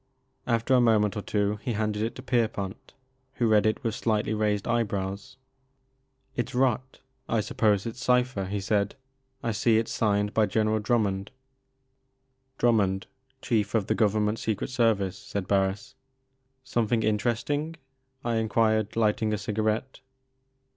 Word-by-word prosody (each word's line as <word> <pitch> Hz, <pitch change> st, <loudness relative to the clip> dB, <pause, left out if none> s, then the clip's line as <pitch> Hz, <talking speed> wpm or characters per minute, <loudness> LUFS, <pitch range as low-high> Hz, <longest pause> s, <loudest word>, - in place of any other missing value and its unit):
After 115 Hz, +1 st, +1 dB
a 125 Hz, -, +6 dB
moment 110 Hz, -3 st, +3 dB
or 105 Hz, -, -2 dB
two 105 Hz, 0 st, 0 dB
he 125 Hz, -, -2 dB
handed 105 Hz, -1 st, -1 dB
it 115 Hz, +1 st, -2 dB
to 130 Hz, -, -9 dB
Pierpont 110 Hz, -6 st, -2 dB, 0.4 s
who 120 Hz, -, +1 dB
read 110 Hz, -1 st, +4 dB
it 110 Hz, -, -1 dB
with 115 Hz, -3 st, -1 dB
slightly 110 Hz, -2 st, 0 dB
raised 105 Hz, -2 st, 0 dB
eyebrows. 100 Hz, -4 st, -2 dB, 1.0 s
"It's 120 Hz, +1 st, -3 dB
rot, 130 Hz, 0 st, 0 dB
— 130 Hz, 0 st, -39 dB
I 115 Hz, -, +2 dB
suppose 105 Hz, -1 st, +1 dB
it's 115 Hz, +2 st, -6 dB
cipher," 125 Hz, -5 st, +2 dB
he 100 Hz, +2 st, -3 dB
said; 100 Hz, 0 st, 0 dB, 0.2 s
" 130 Hz, 0 st, -43 dB
I 115 Hz, -, 0 dB
see 110 Hz, +2 st, +3 dB
it 115 Hz, -, 0 dB
's -, -, -6 dB
signed 105 Hz, -1 st, +1 dB
by 110 Hz, -1 st, +3 dB
General 110 Hz, 0 st, +1 dB
Drummond 105 Hz, -3 st, 0 dB, 0.5 s
" 130 Hz, 0 st, -47 dB
" 130 Hz, 0 st, -47 dB
Drummond, 100 Hz, -5 st, +2 dB, 0.4 s
Chief 110 Hz, -3 st, 0 dB
of 110 Hz, -3 st, +2 dB
the -, -, +1 dB
Government 105 Hz, 0 st, +1 dB
Secret 110 Hz, +3 st, -2 dB
Service," 110 Hz, -6 st, +1 dB
said 130 Hz, -8 st, -5 dB
Barris. 95 Hz, 0 st, 0 dB, 0.4 s
" 130 Hz, -, -46 dB, 0.3 s
Something 120 Hz, -3 st, 0 dB
interesting? 120 Hz, +9 st, 0 dB, 0.2 s
" 130 Hz, 0 st, -45 dB
I 115 Hz, -1 st, +1 dB
enquired, 110 Hz, -1 st, +1 dB
lighting 110 Hz, -1 st, +1 dB
a -, -, 0 dB
cigarette. 110 Hz, +5 st, -2 dB
110 Hz, 160 wpm, -27 LUFS, 105-120 Hz, 1.0 s, a